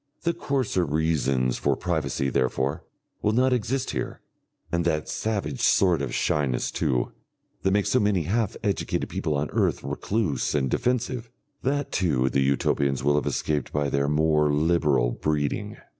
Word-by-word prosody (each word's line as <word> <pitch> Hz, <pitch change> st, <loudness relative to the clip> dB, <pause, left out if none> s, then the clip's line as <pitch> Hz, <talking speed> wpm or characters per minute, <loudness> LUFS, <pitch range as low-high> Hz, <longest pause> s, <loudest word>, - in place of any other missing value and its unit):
The 170 Hz, -, +1 dB
coarser 135 Hz, -, 0 dB
reasons 70 Hz, -5 st, +1 dB
for -, -, +1 dB
privacy, 75 Hz, -6 st, -1 dB
therefore, 65 Hz, +3 st, 0 dB, 0.4 s
will 105 Hz, -, +1 dB
not 130 Hz, +2 st, +3 dB
exist 125 Hz, +2 st, -1 dB
here. -, -, -4 dB, 0.5 s
And 85 Hz, 0 st, +1 dB
that 80 Hz, -2 st, 0 dB
savage 100 Hz, -, -2 dB
sort 90 Hz, -6 st, +3 dB
of 70 Hz, -3 st, -3 dB
shyness, 70 Hz, -5 st, 0 dB
too, 60 Hz, -2 st, 0 dB, 0.5 s
that 95 Hz, -, +2 dB
makes 100 Hz, +1 st, +1 dB
so 130 Hz, -, +4 dB
many 105 Hz, -5 st, +2 dB
half 105 Hz, +5 st, -1 dB
educated 100 Hz, -2 st, -1 dB
people 75 Hz, -, -2 dB
on 70 Hz, +1 st, -2 dB
earth -, -, +1 dB
recluse 100 Hz, -9 st, -1 dB
and 65 Hz, -3 st, +1 dB
defensive, 125 Hz, -1 st, -1 dB, 0.3 s
that 140 Hz, +1 st, -1 dB
too 70 Hz, -8 st, +1 dB
the 70 Hz, -, +2 dB
Utopians 70 Hz, 0 st, +1 dB
will 75 Hz, +1 st, +3 dB
have 75 Hz, -2 st, +1 dB
escaped 75 Hz, -4 st, -1 dB
by 75 Hz, -1 st, 0 dB
their 70 Hz, 0 st, +1 dB
more 75 Hz, 0 st, +3 dB
liberal 75 Hz, -5 st, +2 dB
breeding. 75 Hz, +1 st, -2 dB
80 Hz, 155 wpm, -25 LUFS, 70-105 Hz, 0.5 s, so